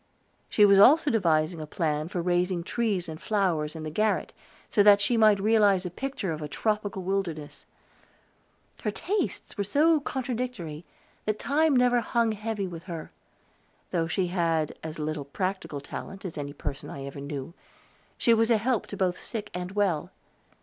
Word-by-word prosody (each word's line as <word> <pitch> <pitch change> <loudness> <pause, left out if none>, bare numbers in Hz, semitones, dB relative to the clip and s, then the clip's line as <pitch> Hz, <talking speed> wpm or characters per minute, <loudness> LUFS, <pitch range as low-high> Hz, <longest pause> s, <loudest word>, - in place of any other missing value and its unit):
She 210 - +5
was 200 -1 +6
also 290 +8 +7
devising 165 -6 +1
a 155 - -6
plan 155 -1 -1
for 175 0 -3
raising 180 0 +1
trees 200 -4 -1
and 160 0 -7
flowers 170 -8 0
in 160 - -6
the 155 - -4
garret, 215 +6 0 0.3
so 210 - +3
that 205 0 +7
she 220 +4 +2
might 215 -3 +5
realize 205 -3 +3
a 180 - -4
picture 255 -3 -3
of 155 -1 -4
a 150 - -3
tropical 205 +3 -2
wilderness. 175 -6 -3 1.1
Her - - -1
tastes 405 - -3
were - - +2
so 305 +10 +3
contradictory 245 - -4 0.4
that 215 0 0
time 300 +3 +2
never 250 -1 +4
hung 230 -1 +1
heavy 215 -1 -3
with 170 -2 -8
her; 170 -4 -7 0.8
though 165 -2 0
she 180 +3 0
had 165 -3 0
as 160 -1 -6
little 155 -1 -3
practical 185 -1 -3
talent 195 +7 -8
as 175 - -5
any 145 -1 -5
person 140 -1 -6
I 135 -1 -7
ever 140 0 -7
knew, 140 +2 -6 0.6
she 235 - +4
was 225 0 +3
a 230 - +5
help 235 +1 0
to 200 - -7
both 180 -2 0
sick 215 -3 -6
and 180 +1 -5
well. 195 -7 0
190 Hz, 170 wpm, -27 LUFS, 160-220 Hz, 1.1 s, also